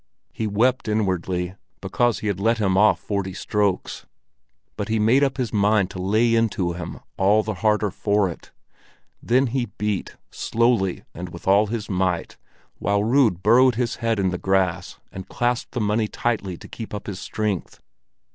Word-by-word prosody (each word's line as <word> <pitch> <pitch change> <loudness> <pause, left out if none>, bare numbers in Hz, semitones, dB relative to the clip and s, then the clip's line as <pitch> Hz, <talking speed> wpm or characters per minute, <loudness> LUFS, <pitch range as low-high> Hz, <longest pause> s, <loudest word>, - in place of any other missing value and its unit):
He 110 - -2
wept 120 +6 +1
inwardly 95 -4 -1 0.3
because 120 +4 0
he - - -6
had 100 -3 -1
let 115 +3 +2
him 95 -3 +1
off 105 +2 +4
forty 100 -3 -3
strokes; 105 -3 -1 0.7
but 105 - -4
he 110 0 0
made 115 +6 +4
up 135 -1 0
his 125 -5 -2
mind 105 -2 +2
to 90 - -6
lay 110 +5 +2
into 105 -6 +1
him 90 +1 -7 0.2
all 105 +3 +3
the 110 - -3
harder 105 -2 +2
for 100 +1 +1
it. 85 - -9 0.7
Then 130 +3 +2
he 125 -3 0
beat, 105 -2 -3
slowly 115 -5 0
and 90 +1 -7
with 85 +1 -11
all 100 +2 +5
his 110 -1 -4
might, 90 -3 -1 0.4
while 100 0 +1
Rud 115 -7 +2
burrowed 125 +4 +5
with - - -10
his 120 -1 -1
head 115 -1 0
in 95 -2 +1
the 90 - -3
grass 95 -2 0
and 95 0 -9
clasped 120 0 -1
the 125 - -2
money 105 +1 +1
tightly 105 -6 -2
to - - -12
keep 110 -2 -7
up 105 - -7
his 100 -3 -5
strength. 105 -4 -3
105 Hz, 175 wpm, -23 LUFS, 95-115 Hz, 0.7 s, all